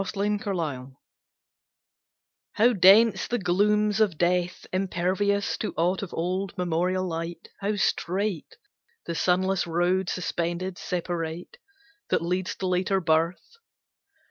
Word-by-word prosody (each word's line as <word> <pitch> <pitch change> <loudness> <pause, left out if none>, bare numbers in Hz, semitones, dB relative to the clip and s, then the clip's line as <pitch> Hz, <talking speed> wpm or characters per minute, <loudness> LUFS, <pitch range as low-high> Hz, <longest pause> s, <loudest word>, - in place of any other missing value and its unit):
THE - - -5
UNREVEALED 170 -11 -2 1.6
How 235 +3 +4
dense 195 +1 +6
the 245 - 0
glooms 210 +2 +2
of 195 -7 +2
Death, 175 +1 0
impervious 190 +2 0
To 215 - -3
aught 175 +3 +1
of 200 - -6
old 185 +3 -3
memorial 180 +1 0
light! 165 0 -5
How 205 +1 -1
strait 200 - -1 0.5
The - - -3
sunless 185 +3 +1
road, 175 +2 +1
suspended, 175 +1 -3
separate, 175 - -4 0.5
That - - +1
leads 180 +2 -2
to 190 - -5
later 185 +2 +1
birth! 170 - 0
185 Hz, 115 wpm, -26 LUFS, 170-200 Hz, 1.6 s, dense